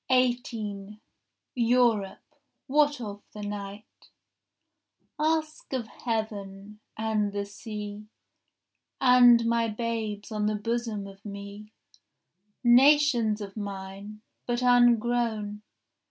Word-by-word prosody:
18 225 -5 -1 0.5
Europe, 235 0 +1 0.3
what 290 0 +2
of 205 -3 -7
the 210 - -7
night?— 205 0 -8 1.1
Ask 310 -1 -1
of 255 -3 -1
heaven, 210 -3 -5 0.2
and 215 -2 0
the 200 0 -2
sea, 210 0 -8 0.9
And 245 -2 +6
my 230 0 +2
babes 220 -2 -4
on 210 -1 -1
the 215 - 0
bosom 225 -1 -3
of 195 0 -13
me, 200 +1 -9 0.9
Nations 245 -3 +5
of 195 -1 -7
mine, 200 +1 -7 0.2
but 240 +1 -1
ungrown. 235 -3 +2
220 Hz, 95 wpm, -27 LUFS, 205-240 Hz, 1.1 s, And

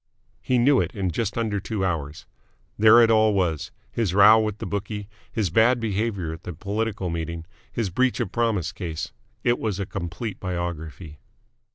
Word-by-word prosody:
He 130 - +1
knew 130 +3 +4
it - - -4
in 95 -3 -1
just 105 +4 -2
under 110 -3 0
two 100 -1 -2
hours. 80 -4 -3 0.5
There 110 +2 +7
it 115 - +4
all 110 -1 +4
was 85 -6 0 0.2
his 95 - -1
row 105 +2 +8
with 110 -2 -1
the - - -6
bookie, 105 0 -4 0.2
his 105 -7 -1
bad 120 +6 +4
behaviour 100 -6 -2
at 80 - -9
the 90 - -6
political 100 +1 -2
meeting, 85 0 -4 0.3
his 110 -5 -2
breach 130 +6 +1
of - - -2
promise 110 -7 0
case. 85 -4 -5 0.3
It 120 0 +2
was 105 -3 -2
a 100 - -1
complete 90 +5 -5
biography. 85 -3 -5
100 Hz, 175 wpm, -24 LUFS, 85-110 Hz, 0.5 s, row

